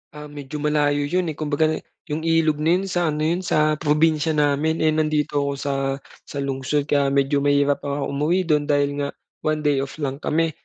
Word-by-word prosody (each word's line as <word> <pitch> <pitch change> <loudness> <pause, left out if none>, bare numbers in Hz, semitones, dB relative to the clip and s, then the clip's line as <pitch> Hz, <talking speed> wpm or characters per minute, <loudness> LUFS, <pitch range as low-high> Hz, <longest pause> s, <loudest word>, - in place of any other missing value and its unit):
Ah, 150 0 -9
medyo 145 0 -7
malayo 145 -1 +1
'yun, 175 +1 0
eh, - - -9
kumbaga, 155 +1 +1 0.4
'yung 150 - -1
ilog 160 -2 +2
na 160 +3 +3
'yun 185 - -1
sa 175 -3 0
ano 150 0 -1
'yun 165 +3 +1
sa 155 -4 +1
probinsya 155 +1 +2
namin, 150 +2 +1
eh, 155 - +4
nandito 155 -1 0
ako 140 0 -1
sa 140 +1 -3 0.5
sa 140 -1 -4
lungsod 140 +2 -1
kaya 145 -1 +1
medyo 140 +1 +2
mahirap 145 0 +2
akong 140 0 -3
umuwi 155 +7 +1
dun 150 -4 +1
dahil 145 -1 +1
nga, 140 0 -1 0.3
1 155 0 -1
day 145 -2 +2
off 135 0 -4
lang 135 0 -2
kami, 165 +1 0
150 Hz, 195 wpm, -22 LUFS, 145-155 Hz, 0.5 s, eh